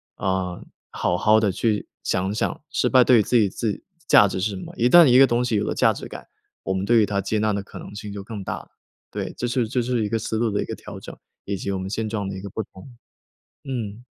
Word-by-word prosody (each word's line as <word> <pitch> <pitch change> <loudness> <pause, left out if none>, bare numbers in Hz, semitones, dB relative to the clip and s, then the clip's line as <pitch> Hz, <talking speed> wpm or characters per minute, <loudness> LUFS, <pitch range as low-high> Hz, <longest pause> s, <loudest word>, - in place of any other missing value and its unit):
啊， 95 -2 -2 0.3
好 90 - 0
好 110 +3 +4
地 105 -3 +1
去 105 +2 -1 0.2
想 95 +1 0
想， 110 - -2
失 - - 0
败 130 -2 +6
对 125 -3 +6
于 - - +3
自 120 - +2
己 105 -3 +4
自 105 +2 -3 0.2
价 105 - +6
值 95 -1 -3
是 105 - +1
什 95 - -6
么， - - -9
一 120 +2 +2
旦 175 +2 +9
一 125 0 +6
个 135 - +9
东 120 0 0
西 115 -3 0
有 105 - +1
了 - - -1
价 - - +3
值 - - -8
感， - - -10 0.4
我 95 - -1
们 95 0 -2
对 115 +3 +3
于 - - +4
它 100 -1 -1
接 105 +3 -1
纳 105 -1 +1
的 100 -1 -2
可 - - -11
能 105 - -10
性 105 -1 -7
就 100 -1 -6
更 105 -1 -7
大 - - -4
了。 - - -12 0.4
对， - - -5
这 120 - -2
是 120 -1 0
这 125 -1 0
是 120 -2 0
一 105 - -2
个 115 0 0
思 110 +1 -3
路 115 -1 +1
的 100 - 0
一 - - -3
个 - - -5
调 - - -10
整， - - -10 0.3
以 100 - -2
及 100 +1 -4
我 95 - -1
们 95 +1 -5
现 110 +1 -2
状 105 -3 -3
的 95 - -5
一 95 - -7
个 100 - -7
不 110 - -4
同， 105 +6 -14 0.8
嗯。 115 -3 -4
105 Hz, 300 characters per minute, -23 LUFS, 100-120 Hz, 0.8 s, 旦